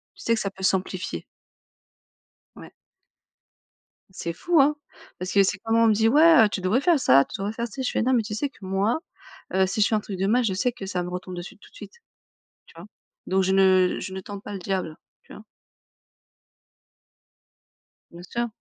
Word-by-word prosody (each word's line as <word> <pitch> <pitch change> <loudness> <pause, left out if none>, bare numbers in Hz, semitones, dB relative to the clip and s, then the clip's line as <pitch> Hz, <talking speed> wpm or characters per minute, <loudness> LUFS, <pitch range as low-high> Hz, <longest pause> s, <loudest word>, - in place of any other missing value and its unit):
tu - - -13
sais 230 - +2
que 225 - -3
ça 195 - -3
peut 190 -1 -12
s'amplifier. 190 -1 -1 1.3
Ouais. - - -13 1.4
C'est 170 -2 -5
fou, 340 - +1
hein? 295 +2 +3 0.4
Parce 185 +1 -4
que 200 -1 +5
c'est 200 - -1
comme 225 +3 0
on 230 0 +5
me 215 - +4
dit: 220 +2 +2
«Ouais, 305 -1 +6
heu, 210 - 0
tu 195 - -4
devrais 205 +9 +1
faire 340 -3 +3
ça, 135 - +5
tu - - -9
devrais 200 +2 -3
faire 235 +1 -3
ci». 260 +4 -6
Je 250 - -1
fais: - - -1
«Non, 260 +2 +1
mais 240 - +3
tu 210 -1 -6
sais 280 +6 -2
que, 210 - -21
moi, 195 +9 0 0.5
heu, 190 0 +3
si 195 +3 -2
je - - +5
fais 220 - 0
un 215 - +2
truc 200 -2 -7
de 195 - 0
mal 245 +4 +2
je 200 - 0
sais 220 +7 0
que 215 -5 -9
ça 180 -2 -3
me 175 - -6
retombe 180 0 -6
dessus 175 +1 -9
tout - - -18
de - - -24
suite», - - -11 0.7
tu - - -20
vois? 170 - -10 0.4
Donc 190 0 +1
je 190 - +1
ne 185 -1 +4
je 190 - -6
ne 190 - -5
tente 200 +1 -9
pas - - -7
le 195 - -5
diable, 185 -4 -3 0.3
tu - - -15
vois? - - -12 2.7
Bien 170 +1 -12
sûr. 235 +6 -3
200 Hz, 220 wpm, -24 LUFS, 185-230 Hz, 2.7 s, Ouais